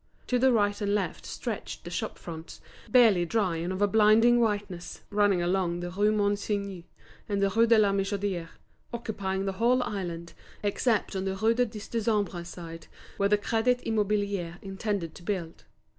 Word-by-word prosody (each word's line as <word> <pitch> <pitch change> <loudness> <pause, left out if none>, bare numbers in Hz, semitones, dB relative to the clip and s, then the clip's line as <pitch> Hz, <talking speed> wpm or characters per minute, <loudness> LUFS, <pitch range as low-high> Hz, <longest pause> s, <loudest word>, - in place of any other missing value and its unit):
To 250 - +1
the 260 +1 +5
right 205 -2 +1
and 205 0 +1
left 195 -5 -3
stretched - - -5
the - - -8
shop - - -3
fronts, 160 -1 -9 0.3
barely 225 -8 +6
dry 185 -2 0
and 170 +3 -3
of 190 +2 -1
a - - +5
blinding 220 +3 +5
whiteness, 205 -6 -2
running 205 -3 +3
along 175 -1 0
the 175 0 -4
Rue 205 +3 +2
Monsigny 200 -3 -1 0.4
and 200 -1 0
the 200 0 +2
Rue 230 +3 +4
de 230 0 +6
la 205 -2 +4
Michodière, 195 -3 -1 0.4
occupying 200 -5 -3
the 195 - 0
whole 250 +2 +4
island, 170 -4 -5 0.3
except 210 +1 0
on 190 0 -2
the 190 0 -1
Rue 220 +4 +2
du 245 +1 +2
Dix 210 -1 -9
Décembre 210 -6 -1
side, 165 -1 -9 0.3
where 200 0 +2
the 210 - +4
Crédit 235 +4 +1
Immobilier 205 -5 0
intended 195 -3 -3
to - - -12
build. 175 -3 -4
200 Hz, 175 wpm, -28 LUFS, 185-215 Hz, 0.4 s, barely